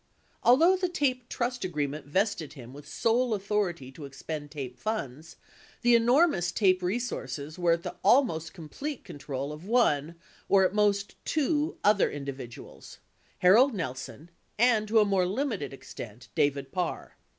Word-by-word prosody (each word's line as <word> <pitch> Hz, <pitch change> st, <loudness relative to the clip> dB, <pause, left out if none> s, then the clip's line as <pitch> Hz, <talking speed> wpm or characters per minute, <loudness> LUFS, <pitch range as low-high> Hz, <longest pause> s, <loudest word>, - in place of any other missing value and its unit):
Although 330 Hz, +10 st, +5 dB
the 365 Hz, -1 st, -1 dB
TAPE 255 Hz, -8 st, -1 dB
trust 245 Hz, 0 st, -2 dB
agreement 150 Hz, -4 st, -3 dB
vested 185 Hz, -1 st, -1 dB
him 125 Hz, -4 st, -11 dB
with 145 Hz, +1 st, -12 dB
sole 235 Hz, 0 st, +1 dB
authority 195 Hz, -9 st, -2 dB
to 145 Hz, +2 st, -10 dB
expend 145 Hz, +2 st, -7 dB
TAPE 130 Hz, -4 st, -7 dB
funds, 160 Hz, -, -4 dB, 0.5 s
the 240 Hz, 0 st, +5 dB
enormous 235 Hz, -, +4 dB
TAPE 185 Hz, -3 st, +3 dB
resources 180 Hz, -, -3 dB
were 175 Hz, -1 st, +3 dB
at 170 Hz, 0 st, -2 dB
the -, -, -5 dB
almost 165 Hz, -, +3 dB
complete 245 Hz, -, -7 dB
control 140 Hz, -1 st, -5 dB
of 150 Hz, +2 st, -10 dB
one, 170 Hz, -, +2 dB, 0.3 s
or 195 Hz, -1 st, +5 dB
at 185 Hz, -, 0 dB
most, 205 Hz, -1 st, 0 dB
two 305 Hz, 0 st, 0 dB
other 205 Hz, -1 st, +4 dB
individuals 130 Hz, -, -8 dB, 0.2 s
— -, -, -35 dB
Harold 235 Hz, +7 st, +6 dB
Nelson 150 Hz, +1 st, -6 dB, 0.3 s
and, 225 Hz, -2 st, +3 dB
to 225 Hz, +2 st, +2 dB
a 210 Hz, -, +5 dB
more 195 Hz, -3 st, +2 dB
limited 220 Hz, -, -2 dB
extent, 120 Hz, -3 st, -10 dB
David 145 Hz, -3 st, 0 dB
Parr. 180 Hz, -2 st, -3 dB
180 Hz, 150 wpm, -28 LUFS, 145-235 Hz, 0.5 s, Harold